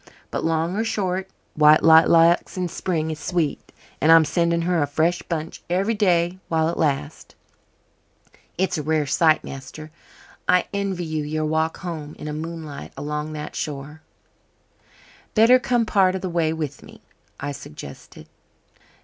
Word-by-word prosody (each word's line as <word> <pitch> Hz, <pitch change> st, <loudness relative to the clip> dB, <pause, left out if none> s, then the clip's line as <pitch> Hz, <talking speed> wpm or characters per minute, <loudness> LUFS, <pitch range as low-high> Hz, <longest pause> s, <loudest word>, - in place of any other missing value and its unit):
But -, -, -3 dB
long 165 Hz, +2 st, 0 dB
or 220 Hz, -, 0 dB
short, 190 Hz, -4 st, -2 dB, 0.2 s
white 155 Hz, 0 st, +5 dB
lilac 165 Hz, +1 st, +6 dB
in 180 Hz, -1 st, -1 dB
spring 160 Hz, -3 st, -2 dB
is 155 Hz, -, -6 dB
sweet, 160 Hz, -2 st, -2 dB, 0.3 s
and 160 Hz, -, +5 dB
I'm 165 Hz, -1 st, +7 dB
sending 170 Hz, +2 st, +1 dB
her 175 Hz, -1 st, +1 dB
a 145 Hz, -, +1 dB
fresh 160 Hz, +4 st, 0 dB
bunch 165 Hz, -1 st, -5 dB
every 195 Hz, +5 st, +1 dB
day 180 Hz, -4 st, +1 dB
while 160 Hz, -1 st, +1 dB
it -, -, -4 dB
lasts. 140 Hz, -, -2 dB, 1.2 s
It's 185 Hz, -2 st, 0 dB
a -, -, -1 dB
rare 155 Hz, 0 st, 0 dB, 0.2 s
night, 155 Hz, -2 st, +4 dB
master. 135 Hz, +3 st, -9 dB, 0.6 s
I 180 Hz, 0 st, +4 dB
envy 195 Hz, -3 st, -2 dB
you 155 Hz, -1 st, -2 dB
your 155 Hz, +1 st, -2 dB
walk 160 Hz, +1 st, 0 dB
home 160 Hz, -5 st, -6 dB
in -, -, -9 dB
the 150 Hz, -, -4 dB
moonlight 160 Hz, -2 st, -7 dB
along 150 Hz, +1 st, -4 dB
that 150 Hz, -1 st, -7 dB
shore." 150 Hz, +1 st, -5 dB, 1.3 s
"Better 235 Hz, +3 st, +6 dB
come 240 Hz, -1 st, +1 dB
part 190 Hz, -3 st, +3 dB
of 190 Hz, -, -4 dB
the 185 Hz, -, -3 dB
way 165 Hz, -2 st, +1 dB
with 155 Hz, -3 st, -4 dB
me," -, -, -15 dB, 0.4 s
I 145 Hz, +1 st, -3 dB
suggested. 75 Hz, -, -11 dB
160 Hz, 155 wpm, -23 LUFS, 155-180 Hz, 1.3 s, I'm